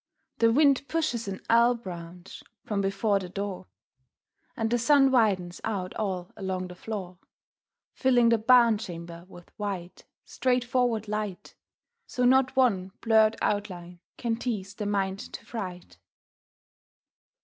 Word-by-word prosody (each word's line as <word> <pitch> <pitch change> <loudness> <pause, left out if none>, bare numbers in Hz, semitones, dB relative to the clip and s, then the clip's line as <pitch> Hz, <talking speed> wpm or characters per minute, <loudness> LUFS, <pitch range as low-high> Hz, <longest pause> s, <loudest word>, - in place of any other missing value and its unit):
The 230 0 +5
wind 280 +1 +3
pushes 315 -9 -1
an 195 -1 -5
elm 235 +1 +4
branch 175 -3 -9 0.2
from 205 -2 -2
before 195 +1 +1
the 185 -2 -7
door 195 - -5 0.9
And 225 0 -1
the 240 - +2
sun 270 +2 +5
widens 195 -8 +1
out 195 -4 -3
all 185 -4 -3
along 185 -2 -4
the 180 - -9
floor, 185 -3 -6 0.7
Filling 245 -3 +3
the 230 -1 +3
barn 235 -1 +5
chamber 170 -3 -8
with 175 -2 -15
white, 190 -4 -5 0.2
straightforward 245 -3 0
light, 210 -3 -4 0.5
So 250 - -1
not 260 +1 +4
one 195 -8 +2
blurred 220 -1 +4
outline 180 -4 -3 0.2
can 230 -2 -1
tease 210 -5 -4
the 210 0 -4
mind 195 -1 -1
to - - -9
fright. 185 -6 -7
210 Hz, 130 wpm, -27 LUFS, 185-235 Hz, 0.9 s, The